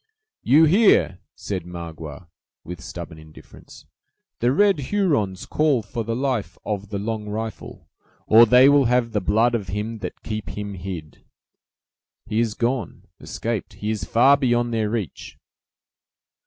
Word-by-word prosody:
"You 150 +5 +5
hear," 185 - +4 0.2
said 95 -4 -4
Magua, 85 -1 -8 0.4
with 90 +1 -8
stubborn 85 -3 -8
indifference: 80 0 -15 0.5
"the 120 +1 +2
red 200 +3 +3
Hurons 145 - 0
call 150 -7 +1
for 115 +3 -5
the 115 +1 -3
life 130 -4 -2
of 105 -1 -4
'The 100 - -3
Long 105 +1 -4
Rifle', 110 +1 -6 0.4
or 115 +2 +7
they 125 +4 +7
will 145 -1 +5
have 120 -1 +1
the 105 -2 -1
blood 110 +6 +2
of 105 -5 -2
him 105 +4 -4
that - - -7
keep 110 -1 -5
him 105 -1 -5
hid!" 90 -4 -8 1.0
"He 110 0 -1
is 115 -3 0
gone—escaped; 115 -2 -4
he 105 +1 -4
is 105 -3 -3
far 130 +8 +4
beyond 120 -3 +1
their 110 -2 0
reach." 110 -6 -5
110 Hz, 140 wpm, -22 LUFS, 100-125 Hz, 1.0 s, or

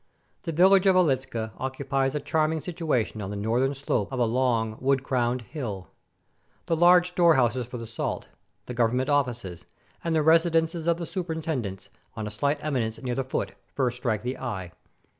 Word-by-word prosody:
The 165 - -4
village 190 +4 +5
of 190 - +5
Wiehczka 130 -9 +1
occupies 135 +1 -1
a - - 0
charming 160 +1 0
situation 155 - -2
on 95 - -4
the 105 - -4
northern 120 +7 0
slope 130 -6 -1
of 130 - -3
a 120 - +3
long, 115 -2 +1
wood 135 0 +1
crowned 125 -1 0
hill. 110 - -6 0.8
The 165 - +1
large 175 +2 +6
store 170 -2 +4
houses 120 -1 +1
for 125 - -6
the 115 - -6
salt, 115 0 -4 0.4
the 125 - -6
government 125 +3 +1
offices, 120 -11 -1 0.4
and 165 -1 0
the 155 - +3
resi 165 +2 +5
dences 165 0 0
of 170 -1 +3
the 170 - -4
superintendents, 160 - -4 0.3
on 110 - -4
a 105 - -5
slight 140 +7 0
eminence 120 -7 -1
near 125 -3 -3
the 135 - -1
foot, 130 - -3 0.2
first 125 -3 0
strike 120 -5 -1
the 125 +2 -3
eye. 95 -9 -4
130 Hz, 180 wpm, -26 LUFS, 115-160 Hz, 0.8 s, large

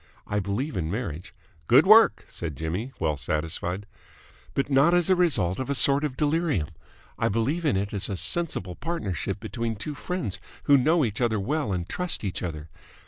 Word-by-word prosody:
I 105 - -1
believe 105 +8 -3
in 80 -4 -2
marriage... 90 -5 -5 0.2
." - - -34
"Good - - +6
work!" - - +6
said 80 -4 -5
Jimmy, 90 - -4
well 80 -2 0
satisfied. 80 +8 -3 0.3
"... - - -26
But 140 - 0
not 140 +5 +4
as 175 -1 +3
the 185 - +4
result 130 - +2
of 130 - -4
a 140 - +1
sort 140 +2 +5
of 145 -4 -3
delirium. 150 - 0 0.5
I - - +2
believe 135 - -1
in 140 -10 +2
it 100 +2 -3
as 100 0 -1
a 100 - -3
sensible 100 - 0
partnership 110 - -3
between 115 -1 -4
two 150 +9 -5
friends 145 - -4 0.2
who 145 - +5
know 150 +3 +3
each 110 +1 -4
other 110 -3 +1
well 135 +3 -1
and 90 -2 -2
trust 180 - -2
each 95 -3 -3
other. 80 -3 -5
110 Hz, 195 wpm, -26 LUFS, 90-150 Hz, 0.5 s, Good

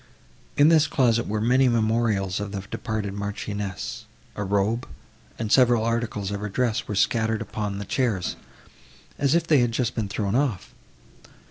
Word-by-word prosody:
In 145 +2 +6
this 155 -2 +5
closet 120 -6 +2
were 105 +1 -1
many 125 +4 +3
memorials 110 -4 +1
of 105 -1 -4
the 100 - -3
departed 100 +1 -4
Marchioness; 100 -1 -5 0.3
a 105 - -3
robe 105 +5 0 0.5
and 110 -2 -3
several 120 -3 +5
articles 115 -4 -2
of 100 - -3
her 105 +1 -4
dress 115 +1 -1
were 105 - -3
scattered 110 +2 +1
upon 105 -2 -4
the 100 - -5
chairs, 110 -6 -1 0.8
as 140 +2 +2
if 170 -1 +2
they 155 -4 +4
had 120 -1 +2
just 120 0 0
been 110 -3 -2
thrown 100 -1 -2
off. 125 -7 -1
110 Hz, 160 wpm, -25 LUFS, 100-120 Hz, 0.8 s, In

